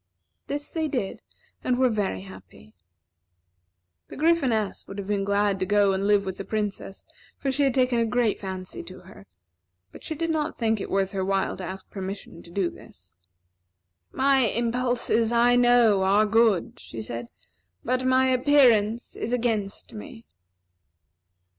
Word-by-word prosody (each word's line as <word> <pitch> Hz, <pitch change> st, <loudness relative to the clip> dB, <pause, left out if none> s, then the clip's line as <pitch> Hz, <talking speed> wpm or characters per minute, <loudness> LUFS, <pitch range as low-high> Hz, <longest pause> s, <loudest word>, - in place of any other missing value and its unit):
This 290 Hz, 0 st, -5 dB
they 320 Hz, -1 st, -1 dB
did, 250 Hz, -9 st, -3 dB, 0.4 s
and 250 Hz, -1 st, +1 dB
were 260 Hz, 0 st, +4 dB
very 205 Hz, -, -1 dB
happy. 100 Hz, +2 st, -14 dB, 1.3 s
The -, -, -10 dB
Gryphoness 265 Hz, -10 st, +1 dB
would 195 Hz, -, -9 dB
have 200 Hz, -, -5 dB
been 200 Hz, 0 st, -1 dB
glad 200 Hz, 0 st, +1 dB
to -, -, 0 dB
go 205 Hz, -1 st, +3 dB
and 195 Hz, +1 st, -1 dB
live 205 Hz, -1 st, +3 dB
with 190 Hz, -1 st, -5 dB
the -, -, -3 dB
Princess, 205 Hz, -1 st, -4 dB, 0.3 s
for 270 Hz, -, -1 dB
she 275 Hz, +2 st, -1 dB
had 270 Hz, -3 st, +2 dB
taken 250 Hz, -2 st, +2 dB
a 230 Hz, -, +2 dB
great 235 Hz, -2 st, +1 dB
fancy 185 Hz, -2 st, -6 dB
to 185 Hz, 0 st, -11 dB
her; 180 Hz, -, -15 dB, 0.6 s
but -, -, -13 dB
she 315 Hz, -, -3 dB
did 330 Hz, +2 st, -1 dB
not 310 Hz, 0 st, -2 dB
think 220 Hz, -3 st, 0 dB
it -, -, -5 dB
worth 195 Hz, -1 st, 0 dB
her 190 Hz, -1 st, -2 dB
while 195 Hz, 0 st, 0 dB
to 185 Hz, -, -7 dB
ask 190 Hz, +2 st, -6 dB
permission 195 Hz, -3 st, -7 dB
to -, -, -15 dB
do 180 Hz, 0 st, -1 dB
this. -, -, -16 dB, 1.0 s
"My 270 Hz, 0 st, +3 dB
impulses, 235 Hz, -1 st, +1 dB
I 240 Hz, +1 st, +4 dB
know, 240 Hz, -5 st, +5 dB
are 200 Hz, +3 st, +4 dB
good," 215 Hz, -3 st, +2 dB
she 115 Hz, -, -9 dB
said; 115 Hz, +2 st, -6 dB, 0.6 s
"but 255 Hz, 0 st, 0 dB
my 260 Hz, 0 st, +3 dB
appearance 250 Hz, -4 st, +3 dB
is 230 Hz, -, -4 dB
against 225 Hz, -5 st, -2 dB
me." 225 Hz, +1 st, -10 dB
215 Hz, 160 wpm, -25 LUFS, 195-250 Hz, 1.3 s, know